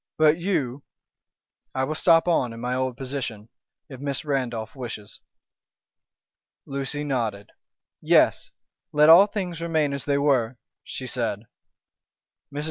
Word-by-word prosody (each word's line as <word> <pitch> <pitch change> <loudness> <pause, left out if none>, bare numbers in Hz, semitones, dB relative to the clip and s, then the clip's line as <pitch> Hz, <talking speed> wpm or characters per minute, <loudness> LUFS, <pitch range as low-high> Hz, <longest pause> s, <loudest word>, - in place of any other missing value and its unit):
But 155 +1 +4
you 145 -8 -1 0.5
" - - -54
"I 130 - +1
will 150 - -1
stop 165 +2 +4
on 130 -9 +1
in 115 - -9
my 125 +1 -2
old 130 -1 -2
position, 125 -5 -5 0.4
if 130 -3 -10
Miss 140 +1 -3
Randolph 120 -6 -2
wishes." 115 -5 -7 1.5
Lucy 140 +1 -3
nodded. 115 -8 -3 0.5
"Yes! - - +3 0.4
let 150 +1 +5
all 180 +5 +9
things 180 -5 -4
remain 160 -4 0
as 140 - -4
they 140 -1 +1
were," 130 -4 +1 0.3
she 130 - -7
said. 115 -5 -2 1.1
Mrs. 145 - -5
135 Hz, 130 wpm, -25 LUFS, 120-150 Hz, 1.5 s, all